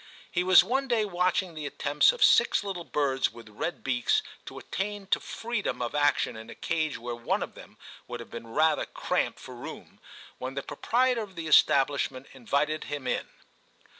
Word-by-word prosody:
He 180 - +1
was 185 0 +8
one 270 +3 0
day 230 -4 +2
watching 180 -1 0
the 155 -2 -5
attempts 145 +1 +3
of - - 0
six - - +5
little 190 -4 -4
birds 140 -4 0
with 115 -1 -13
red 105 +11 -4
beaks 125 -2 +1 0.2
to - - -8
attain 205 +1 -4
to - - +3
freedom 235 -2 -3
of 120 -1 -3
action 145 -5 +2
in 110 +1 -10
a - - -9
cage 155 -3 -1
where 120 +1 -5
one 120 0 -1
of - - -8
them - - -14 0.3
would 120 0 -6
have 115 - -10
been 115 0 -7
rather 155 +8 +2
cramped - - -1
for - - -10
room, - - -10 0.4
when 130 +1 -5
the 140 - -3
proprietor 250 0 +1
of 200 -3 -8
the 165 -1 -5
establish 140 -2 +4
ment 130 +1 -11
invited 140 +5 -1
him 145 -2 -5
in. - - -1
150 Hz, 190 wpm, -28 LUFS, 130-190 Hz, 0.4 s, was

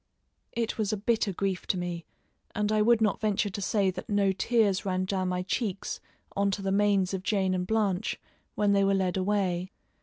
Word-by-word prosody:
It 235 -1 -2
was 210 -1 +1
a 215 - -1
bitter 220 0 +1
grief 190 0 -2
to 185 - +1
me, 175 -2 -4 0.5
and 210 0 0
I 215 0 +3
would 230 +1 +4
not 215 -2 +2
venture 210 -1 +1
to 200 - -5
say 195 -1 +2
that 185 - -8
no 200 -2 +3
tears 200 0 +2
ran 185 -1 -1
down 185 -1 -1
my 180 0 -1
cheeks 195 +1 -2 0.4
on 200 0 +2
to 195 0 -2
the 195 - 0
manes 200 -2 +2
of 190 - -2
Jane 190 -1 +1
and 180 -1 -1
Blanche 210 -2 0 0.4
when 205 -1 +2
they 200 0 +4
were 195 0 +3
led 185 -2 0
away. 185 -2 0
195 Hz, 205 wpm, -28 LUFS, 185-210 Hz, 0.5 s, would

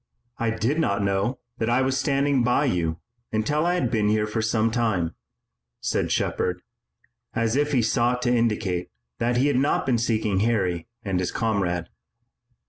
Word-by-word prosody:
"I 115 - +1
did 115 +7 0
not 100 -9 +1
know 100 +6 0 0.2
that 115 - 0
I 125 +2 +3
was 130 0 +1
standing 140 -1 +2
by 125 +5 +2
you 85 - 0 0.3
until 150 +10 +1
I 175 - +2
had 125 -9 0
been 105 -3 +2
here 105 0 +2 0.2
some 110 0 +1
time," 105 -9 0 0.7
said - - -1
Shepard, 90 0 -1 0.7
as 115 +1 +1
if 145 +1 +1
he 125 -5 +3
sought 120 +2 +1
to 125 0 +2
indicate 105 -6 0 0.3
that 120 +1 +1
he 130 - +3
had 145 -3 +2
not 140 +3 +1
been 125 -3 +2
seeking 110 -4 +1
Harry 95 -6 0 0.2
and 95 -3 -1
his 90 - -1
comrade. 95 -7 -1
115 Hz, 165 wpm, -25 LUFS, 100-125 Hz, 0.7 s, I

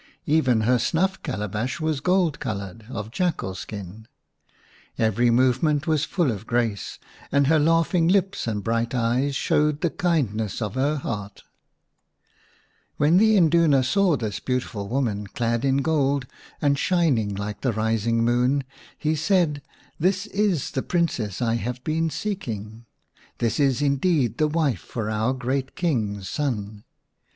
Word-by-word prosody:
Even 130 -7 +3
her 125 +3 +3
snuff 190 +8 0
calabash 115 - -3
was 155 -3 -1
gold 180 0 +1
coloured, 105 -4 -5
of 110 -3 -6
jackal 155 - -1
skin,^ 100 +2 -8 0.9
Every 115 +2 +2
movement 130 +5 +2
was 155 -3 +1
full 170 -9 0
of 105 0 -7
grace, 115 -4 -1 0.3
and 140 0 +3
her 155 +3 +4
laughing 165 +2 +3
lips 195 -4 +1
and 105 -3 -2
bright 115 +2 -1
eyes 125 +4 +1
showed 150 +1 +1
the 170 - +1
kindness 130 - -1
of 105 -4 -3
her 140 +4 0
hear^X 100 -2 -5 1.6
When 150 +4 +4
the 220 +1 +5
Induna 160 -5 +4
saw 185 +3 +2
this 105 -5 -3
beautiful 125 -6 -3
woman 110 -6 -1
clad 120 0 -1
in 135 0 +2
gold 140 -4 +1 0.4
and 140 -1 +2
shining 140 - +1
like 100 +1 -5
the 130 - +1
rising 115 +1 0
moon, 125 +4 +2 0.3
he 155 0 0
said, 160 -2 +1 0.2
" - - -32
This 185 +4 +1
is 200 -8 0
the 130 - -1
Princess 125 - -1
I 115 0 +1
have 125 +2 -5
been 160 +1 0
seeking! 115 - -5 0.5
This 115 +1 -1
is 140 -1 +2
indeed 140 - +1
the 155 - +3
wife 150 - 0
for 110 -3 -4
our 110 +3 +1
great 130 +1 -2
King's 110 - -1
son 105 -8 -3
130 Hz, 145 wpm, -24 LUFS, 110-160 Hz, 1.6 s, the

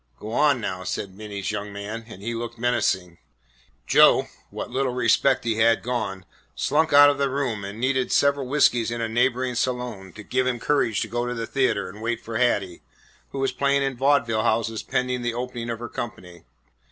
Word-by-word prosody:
"Go 110 - -7
on 140 +2 +3
now," 95 -4 -4
said 95 +1 -4
Minty's 100 -1 -5
young 105 0 -4
man; 105 +3 -6
and 100 -4 -11
he 115 +2 -3
looked 115 0 -5
menacing. 95 -7 0 0.7
Joe, - - +5 0.2
what - - -6
little 130 0 0
self - - -6
respect 125 +3 +3
he 115 -2 -1
had 115 +1 +3
gone, 100 -6 -3 0.3
slunk 160 +2 +1
out 145 0 +8
of 140 - -5
the 140 -1 +1
room 130 -7 -2
and 100 +3 -7
needed 130 0 0
several 140 -2 +2
whiskeys 125 -4 +3
in 120 0 -4
a 115 - -1
neighbouring 125 +2 +1
saloon 125 -6 -3
to 105 - -10
give 130 +4 0
him 125 -2 -1
courage 125 -5 +1
to 115 - -2
go 120 +2 -2
to 125 - -3
the 115 -1 -3
theatre 130 -3 0
and 100 +4 -11
wait 115 0 -1
for 115 -1 -5
Hattie, 100 -8 0 0.5
who - - -8
was 135 0 0
playing 140 0 +1
in 135 -1 -1
vaudeville 120 -4 +2
houses 115 0 0
pending 125 0 -1
the 120 -1 -2
opening 120 -1 -4
of 115 - -2
her 120 +1 -6
company. 90 -9 -8
120 Hz, 200 wpm, -24 LUFS, 110-130 Hz, 0.7 s, out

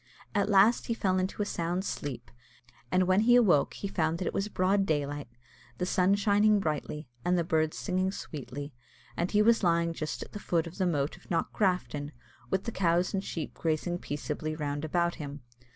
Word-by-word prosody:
At 200 -1 +1
last 205 +3 +5
he 230 - 0
fell 185 -4 +1
into 190 +3 -1
a - - -3
sound 175 0 -2
sleep, 130 -9 -5 0.6
and 185 0 +4
when 185 +1 +3
he 240 +2 +5
awoke 195 -12 +4
he 200 - -4
found 165 -4 0
that 180 - -3
it - - -1
was 195 - -1
broad 195 0 +2
daylight, 145 -2 -1 0.5
the 180 - -1
sun 185 +1 +3
shining 205 +1 +4
brightly, 150 -3 -3 0.2
and 180 +3 +2
the 170 - +2
birds 160 -1 0
singing 185 -1 0
sweetly; 145 -4 -7 0.4
and 175 - -1
that - - -10
he 210 0 +5
was 230 +1 +4
lying 170 -2 +2
just 155 -1 -4
at - - -14
the 205 - -6
foot 170 -4 0
of 170 +4 -9
the 185 - +2
moat 145 -1 -1
of 180 - -20
Knockgrafton, 170 -5 0 0.4
with 190 - 0
the 230 - -3
cows 175 -2 +1
and 195 0 -1
sheep 165 -5 -5
grazing 165 +2 -1
peaceably 150 +1 -4
round 145 -1 -3
about 170 +2 +1
him. 145 0 -7
175 Hz, 200 wpm, -29 LUFS, 155-195 Hz, 0.6 s, last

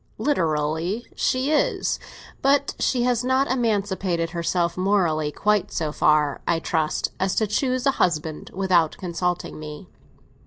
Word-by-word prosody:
"Literally, 165 - 0
she 260 +3 0
is. 305 - +1 0.4
But 280 +1 +2
she 245 -2 +1
has 245 -1 +1
not 260 +1 +2
emancipated 195 -8 0
herself 170 0 0
morally 175 -6 +1
quite 210 +3 +1
so 155 -2 -2
far, 150 -1 +2
I 170 - +2
trust, 160 -1 -1
as 190 0 0
to 220 - +2
choose 255 +5 0
a 275 - +5
husband 155 -3 0
without 180 -4 +2
consulting 175 -2 -3
me. 150 +3 -8
185 Hz, 130 wpm, -24 LUFS, 160-240 Hz, 0.4 s, a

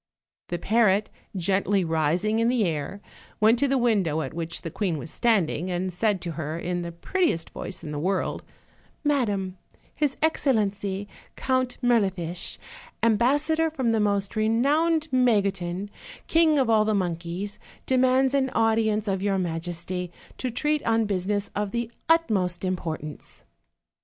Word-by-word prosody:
The 175 - -2
parrot, 210 +1 +2 0.2
gently 195 +1 +1
rising 165 +7 +1
in 230 +1 +3
the 245 -4 +2
air, 165 +4 -3 0.4
went 220 +2 +5
to 280 - +3
the 270 0 +2
win 235 -5 +3
dow 160 -3 -1
at - - -5
which 165 0 -5
the 165 - -5
queen 180 -4 -1
was 155 +2 -7
standing, 185 -7 +1
and 180 +1 -2
said 200 0 +1
to 170 - -4
her, 155 0 -4
in 175 +1 -2
the 170 0 -5
prettiest 170 - -1
voice 185 0 -6
in 150 - -6
the 150 - -3
world: 185 +4 -1 0.6
"Madam, 205 -11 0 0.3
his 295 -3 0
excellency, 205 -10 0 0.3
Count 255 -1 0
Mirlifiche, 190 -8 0 0.5
ambassador 290 +9 +3
from 260 -7 0
the 225 - +2
most 200 0 0
renowned 290 +9 +2
Magotin, 200 -6 +1 0.3
king 320 -2 +4
of 265 -3 +3
all 220 -2 +4
the 215 0 +1
monkeys, 180 +2 -3 0.3
demands 260 +1 +3
an 270 -1 +2
audience 220 -1 +2
of 190 -1 0
your 200 -1 +1
majesty, 175 +1 -3 0.3
to 255 - -1
treat 300 +5 0
on 225 -1 +2
business 200 +1 -1
of 205 0 -1
the 235 +2 -3 0.2
utmost 200 - +2
im 185 0 +1
portance." 155 -4 -7
205 Hz, 150 wpm, -26 LUFS, 180-240 Hz, 0.6 s, went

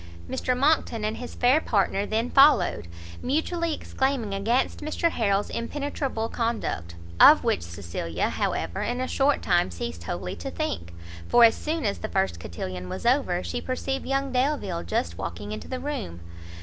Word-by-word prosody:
Mr 250 - -1
Monckton 265 -6 +2
and 215 +1 -2
his 245 - -7
fair 255 +5 +4
partner 200 -3 +1
then 225 +3 -1
followed, 270 - +5 0.3
mutually 330 +4 0
exclaiming 265 -7 -1
against 225 +6 0
Mr 310 +2 0
Harrel's 200 -5 0
impenetrable 265 -2 -3
conduct; 225 - -2 0.2
of - - +9
which - - +1
Cecilia, 85 -1 -3
however, 85 +2 -2
in 245 +1 -2
a 255 - -1
short 275 +2 +1
time 175 - +2
ceased 85 -1 -6
wholly 90 +1 -4
to 85 - -5
think, 85 0 -3 0.4
for 240 - +6
as 225 -1 +8
soon 315 -3 -3
as 200 - -1
the - - -4
first 90 -3 0
cotillon 90 +2 -6
was - - -6
over, 235 -9 +2
she 245 - -3
perceived 270 +1 -3
young 275 0 0
Delvile 260 - 0
just 85 0 -2
walking 90 +5 -5
into 105 0 -6
the 255 - -4
room. 255 - -4
225 Hz, 160 wpm, -26 LUFS, -, 0.4 s, of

